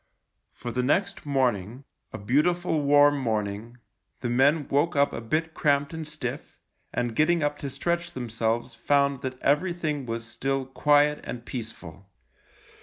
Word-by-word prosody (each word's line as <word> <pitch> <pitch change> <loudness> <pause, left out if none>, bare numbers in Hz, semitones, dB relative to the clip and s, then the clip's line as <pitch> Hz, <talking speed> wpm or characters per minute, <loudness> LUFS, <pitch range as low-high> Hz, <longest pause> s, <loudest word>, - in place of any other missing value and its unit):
For 120 - -7
the 125 - 0
next 185 +6 0
morning 125 -3 0
— - - -52
a - - -6
beautiful 155 - +1
warm 145 0 +5
morning 110 -1 -3 0.2
— - - -47
the 120 -1 -2
men 140 +4 +3
woke 145 +4 +1
up 140 0 +3
a - - -4
bit 160 +7 -1
cramped 145 0 +1
and 160 -1 -5
stiff, 155 0 -6 0.3
and 120 -2 -2
getting 160 +3 +3
up 145 0 -1
to 140 - -4
stretch 170 +4 -2
themselves 115 -1 -2
found 140 +3 +1
that 130 -1 -5
everything 150 -2 0
was 115 0 -4
still 135 +3 -2
quiet 145 +2 +3
and 120 -1 -7
peaceful. 100 -7 -8
140 Hz, 155 wpm, -26 LUFS, 120-150 Hz, 0.3 s, warm